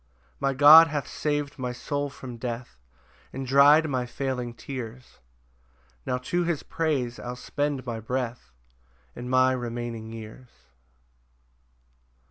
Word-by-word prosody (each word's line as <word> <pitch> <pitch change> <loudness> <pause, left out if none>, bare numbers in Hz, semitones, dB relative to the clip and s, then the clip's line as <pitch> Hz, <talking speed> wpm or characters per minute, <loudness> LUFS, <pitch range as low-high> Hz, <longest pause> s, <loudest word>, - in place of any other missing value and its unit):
6 - - -38
My 135 0 0
God 155 +4 +9
hath 145 -3 -3
sav'd 145 -2 -3
my 125 -1 -2
soul 145 +4 -3
from 130 -3 -9
death, 120 - -6 0.5
And 135 +1 -5
dry'd 145 +4 +6
my 130 -4 -2
failing 125 -2 -4
tears; 125 -2 -8 0.9
Now 125 - 0
to 175 +8 -1
his 170 -3 -2
praise 135 -7 -2
I'll 125 0 -6
spend 145 +1 -3
my 115 -2 -4
breath, 120 - -4 0.6
And 125 +1 -7
my 130 0 +4
remaining 120 -2 -4
years. 115 +2 -10
130 Hz, 125 wpm, -26 LUFS, 120-145 Hz, 0.9 s, God